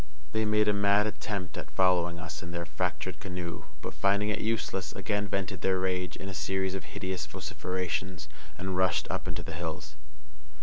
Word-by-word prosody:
They 110 0 +2
made 105 0 +4
a 105 - +5
mad 100 +1 +5
attempt 100 -5 -2
at - - -6
following 90 -2 +4
us 80 -2 -5
in 85 - -6
the 85 0 -2
fractured 90 +3 -1
canoe, 90 -3 -4 0.2
but, - - -3
finding 100 +1 +3
it 105 - +1
useless, 95 -6 0
again 105 +2 0
vented 95 -2 -1
their 95 -1 +3
rage 90 -1 0
in 95 - -6
a 95 - -4
series 95 +1 0
of 95 -4 -3
hideous 95 +4 -3
vociferations, 90 -2 -2 0.3
and 95 0 -2
rushed 95 0 +3
up - - -2
into - - -2
the - - -5
hills. 80 -2 -4
95 Hz, 180 wpm, -31 LUFS, 85-100 Hz, 0.3 s, a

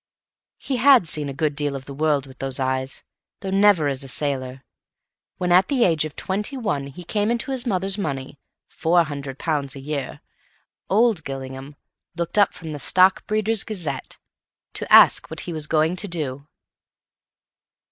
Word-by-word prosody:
He 265 - -3
had 250 -6 +6
seen 150 -2 0
a - - -3
good 145 +1 -1
deal 145 -1 -1
of 135 -1 -7
the 140 - -8
world 145 -1 0
with 130 -1 -15
those 135 0 -1
eyes, 130 0 -2 0.4
though 190 - -4
never 195 -5 +4
as 135 -1 -2
a - - -9
sailor. 130 -1 -3 0.7
When 180 -1 -1
at 180 +2 +5
the 265 -4 +2
age 160 -5 +2
of 155 - -8
twenty 210 +8 -3
one 175 - -2
he 140 +6 -10
came 205 +4 -1
into 235 +3 -1
his 255 -1 0
mother's 195 -1 -1
money, 140 -5 -4 0.3
£400 145 -3 -1
a - - -8
year, 140 0 -5 0.7
old 215 -4 +3
Gillingham 135 +1 -7 0.4
looked 170 +4 -1
up 200 - +5
from 160 -2 -8
the 145 - -6
"Stockbreeders' 210 +6 +3
Gazette" 165 - -5 0.6
to - - -5
ask - - +7
what - - -5
he 175 - -6
was 155 -2 -1
going 160 +2 +1
to 205 - -2
do. 145 -5 -4
155 Hz, 165 wpm, -22 LUFS, 140-195 Hz, 0.7 s, ask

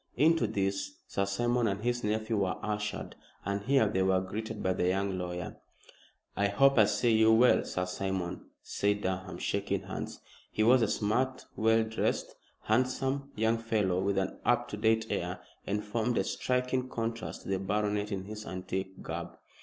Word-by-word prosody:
Into 165 +2 +4
this 95 0 -2
Sir 100 - -1
Simon 120 +4 +1
and 100 +1 -2
his 120 0 0
nephew 110 +1 0
were 95 -2 0
ushered, 105 0 -3 0.3
and 100 +1 -1
here 135 +2 +3
they 95 -2 0
were 95 0 +3
greeted 105 +3 -5
by 95 - +2
the 90 -1 0
young 95 +1 0
lawyer. 90 -1 -4 0.8
"I 100 - +2
hope 135 +6 +4
I 110 - +8
see 115 +2 +2
you 110 0 +6
well, 120 +3 +5
Sir 90 - -2
Simon?" 95 -1 -3 0.2
said 105 0 0
Durham, 95 0 -3
shaking 100 -1 -1
hands. 95 0 -6 0.3
He 110 - +1
was 125 +3 +6
a 110 - +3
smart, 125 +6 0
well 110 +1 +3
dressed, 110 0 -1 0.3
handsome 130 +4 0
young 110 +1 +2
fellow 105 -5 +1
with 100 0 0
an 95 0 -1
up 120 0 +2
to 105 - -5
date 110 +1 +2
air, - - -2 0.3
and 105 +1 -1
formed 115 +3 -1
a - - +3
striking 125 0 -1
contrast 115 -1 -4
to - - -8
the 95 -1 +1
baronet 105 +1 -1
in 95 -2 -2
his 105 +2 -7
antique 95 +1 -4
garb. - - -5
105 Hz, 175 wpm, -30 LUFS, 95-115 Hz, 0.8 s, I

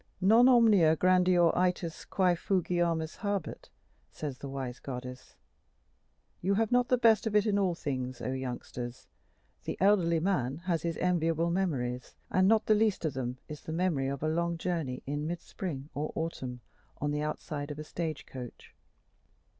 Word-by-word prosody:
Non 225 +7 +6
omnia 210 -10 +6
grandior 180 -1 +4
ætas 180 -2 -1
quæ 180 -2 +3
fugiamus 170 -3 0
habet, 200 -6 -3 0.4
says 145 -4 -6
the 140 - -6
wise 130 -2 -5
goddess: 125 -1 -8 1.1
you 195 +3 +1
have 225 +1 +1
not 245 0 +3
the 250 - +3
best 225 -2 +4
of 210 - -2
it 210 0 +4
in 205 -2 +2
all 185 -3 +1
things, 130 -5 -4
O 130 - -3
youngsters! 125 -1 -5 0.6
the - - -4
elderly 180 -4 +4
man 150 -7 0
has 170 -4 0
his 170 0 -2
enviable 170 -2 +1
memories, 125 -10 -2 0.2
and 185 0 +4
not 220 +1 +4
the 215 - +4
least 215 -4 +1
of 155 - 0
them 125 -1 -3
is 150 -1 -8
the - - -7
memory 165 -5 0
of 140 +1 -4
a - - +1
long 170 +1 0
journey 165 -7 -3
in 145 +2 -3
mid 170 +1 -3
spring 150 -7 -6
or 150 +2 -3
autumn 130 -7 -4 0.4
on 145 0 -1
the 150 0 -1
outside 150 -1 -4
of 150 - -6
a 155 - -5
stage 155 -1 -4
coach. 125 -2 -10
165 Hz, 170 wpm, -30 LUFS, 140-185 Hz, 1.1 s, Non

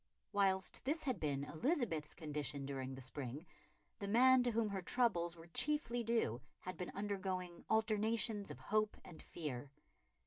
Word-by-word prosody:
Whilst 190 -2 +2
this 310 +4 0
had 255 -9 -1
been 140 -3 0
Elizabeth's 165 - -1
condition 150 -3 -3
during 135 -1 -4
the 135 - -8
spring, 135 +4 -5 0.5
the 200 - -3
man 255 +4 +7
to 245 - +2
whom 225 -2 +1
her 195 -1 -2
troubles 175 -5 +2
were 165 - -11
chiefly 240 - +1
due 225 - +1 0.2
had 185 - -5
been 180 - -4
undergoing 190 -3 -3
alternations 220 -1 +2
of - - -6
hope 215 0 +1
and 170 - -10
fear. 145 -5 -5
190 Hz, 150 wpm, -39 LUFS, 155-230 Hz, 0.5 s, man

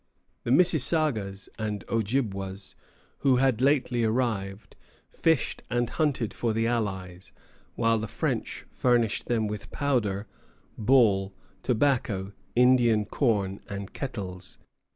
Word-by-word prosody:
The - - -2
Mississagas 140 - +2
and 105 -4 -3
Ojibwas, 100 -4 -2 0.5
who 135 -2 +4
had 125 -2 +2
lately 130 -3 +2
arrived, 110 -4 -1 0.4
fished 160 -4 +1
and 120 -1 0
hunted 140 -8 0
for 115 -2 -1
the 115 +1 0
allies, 95 -6 -3 0.4
while 115 0 +2
the 110 - -4
French - - -3
furnished 120 -4 +1
them 115 -2 +1
with 105 -1 -5
powder, 110 -8 0 0.5
ball, 105 -5 +3 0.3
tobacco, 115 -6 0 0.2
Indian 120 -3 +4
corn, 100 -6 0
and 100 -1 -6
kettles. 95 -9 -6
115 Hz, 110 wpm, -27 LUFS, 100-125 Hz, 0.5 s, who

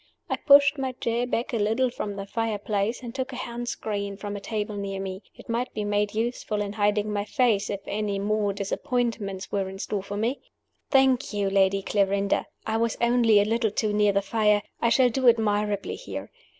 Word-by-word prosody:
I - - +3
pushed 285 0 +6
my 260 -1 -2
chair 235 0 -1
back 245 0 -2
a - - +1
little 225 +5 +1
from 205 -4 -4
the 195 0 -5
fire 225 +1 -2
place, 205 +4 -2
and 235 -1 -6
took 265 0 -3
a - - -6
hand 240 0 -4
screen 200 -2 -3
from 205 0 -5
a - - -4
table 210 0 -3
near 200 -1 -4
me; 190 0 -5
it - - -14
might 235 +2 -1
be 210 - -2
made 205 0 0
useful 225 -2 -2
in 205 -1 -2
hiding 210 0 +1
my 205 -1 0
face, 215 -3 +1
if 200 -1 -3
any 205 -1 -2
more 205 +1 0
disappointments 205 -1 -2
were 195 -2 -1
in 190 - -8
store 200 +1 -3
for 200 +1 -6
me. 235 +6 -1 0.5
"Thank 265 -3 +3
you, 200 -1 0
Lady 195 0 +3
Clarinda; 200 0 +1 0.2
I 220 0 0
was 230 0 0
only 235 -3 +4
a 205 - +3
little 225 +1 +1
too 210 +1 -1
near 210 0 +4
the 200 0 +1
fire. 210 -1 +2 0.2
I 235 - +3
shall 250 +1 +5
do 255 +1 +4
admirably 210 -3 0
here. - - -7
210 Hz, 205 wpm, -26 LUFS, 200-235 Hz, 0.5 s, pushed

